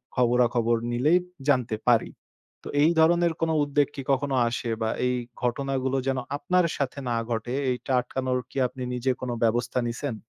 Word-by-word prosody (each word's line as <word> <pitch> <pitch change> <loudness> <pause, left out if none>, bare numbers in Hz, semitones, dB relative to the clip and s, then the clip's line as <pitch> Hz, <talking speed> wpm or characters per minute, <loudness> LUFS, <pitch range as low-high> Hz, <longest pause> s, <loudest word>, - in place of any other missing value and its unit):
খবরাখবর 120 -1 +2
নিলেই 145 +9 +3 0.3
জানতে 125 -6 +2
পারি। 115 -2 +3 0.5
তো - - -7
এই 160 - +5
ধরনের 170 +1 +4
কোনো 165 -1 +1
উদ্বেগ 145 0 +2
কি, 135 - -4
কখনো 135 0 +1
আসে? 115 0 -3
বা 110 - +1 0.2
এই 125 - +2 0.3
ঘটনাগুলো 130 +1 -1
যেন 135 -1 +1 0.2
আপনার 180 +1 +2
সাথে 140 0 -2
না 120 - 0
ঘটে, 115 +2 -2 0.2
এইটা 125 +2 -4
আটকানোর 130 0 -2
কি, - - -10
আপনি 130 +1 -11
নিজে 125 +1 0
কোন 125 - -3
ব্যবস্থা 120 +2 +1
নিছেন? 120 +1 -3
130 Hz, 165 wpm, -26 LUFS, 120-140 Hz, 0.5 s, এই